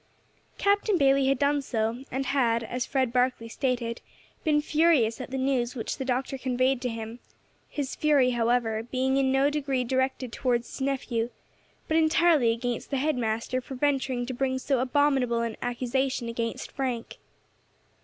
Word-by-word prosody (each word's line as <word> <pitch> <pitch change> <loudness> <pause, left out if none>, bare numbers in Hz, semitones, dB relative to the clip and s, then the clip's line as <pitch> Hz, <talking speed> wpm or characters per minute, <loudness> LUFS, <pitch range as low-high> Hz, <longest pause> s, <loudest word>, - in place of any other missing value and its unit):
Captain 405 0 +2
Bayley 275 -2 +4
had 275 0 +3
done 285 +2 +2
so, 230 -1 -2
and 270 +2 -2
had, 235 -4 +1
as 245 +2 -3
Fred 260 -3 0
Barkley 250 -2 +1
stated, 240 -1 -2 0.4
been 305 -4 +3
furious 295 -7 +2
at 255 - -7
the 265 - -3
news 260 -2 0
which 230 - -3
the 265 - -2
Doctor 260 +1 -1
conveyed 255 0 +1
to 250 - -1
him; 225 +1 -6 0.5
his 280 -3 -3
fury, 285 -4 +3
however, 235 -2 +1
being 260 +3 0
in 265 -1 +2
no 270 +2 +3
degree 275 -4 -1
directed 260 0 -1
towards 240 -2 0
his - - -8
nephew, 250 -4 -1 0.6
but 315 - +2
entirely 315 -5 +4
against 240 +1 -3
the 275 - -1
head 300 +3 +1
master 230 +2 -1
for 265 - -8
venturing 265 -2 0
to 255 - -4
bring 260 +1 -1
so 260 0 0
abominable 260 -2 +2
an 230 -2 -2
accusation 250 +1 -1
against 230 0 -4
Frank. 250 -4 -4
260 Hz, 165 wpm, -27 LUFS, 240-275 Hz, 0.6 s, Bayley